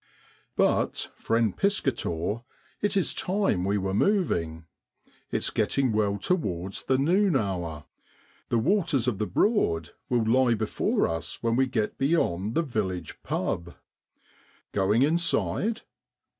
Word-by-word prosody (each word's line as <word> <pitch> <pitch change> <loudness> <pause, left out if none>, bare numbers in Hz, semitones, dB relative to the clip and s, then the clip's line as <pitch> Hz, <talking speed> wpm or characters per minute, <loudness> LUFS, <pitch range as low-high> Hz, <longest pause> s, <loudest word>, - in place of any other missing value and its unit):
But, - - +1
friend 115 -3 +1
Piscator, 115 - -1 0.4
it 205 -1 +1
is 190 - +1
time 190 - 0
we 100 +2 +1
were 95 -1 -2
moving. 85 - +1 0.6
It's - - 0
getting 135 -3 +1
well 105 -2 +1
towards 100 - -2
the 130 - +2
noon 180 +5 +3
hour. 90 - -2 0.6
The 120 - +2
waters 150 - +2
of 110 -6 0
the 105 - 0
Broad 85 - +1 0.2
will 120 -3 +2
lie 120 +1 +4
before 110 -1 0
us 80 +6 -5
when 115 0 +2
we 130 +1 +3
get 110 -4 -2
beyond 115 - +1
the 165 - +3
village 95 - -3
' - - -47
pub.' 85 0 -2 1.0
Going 105 +5 +2
inside? 170 +7 +1
115 Hz, 130 wpm, -27 LUFS, 95-155 Hz, 1.0 s, lie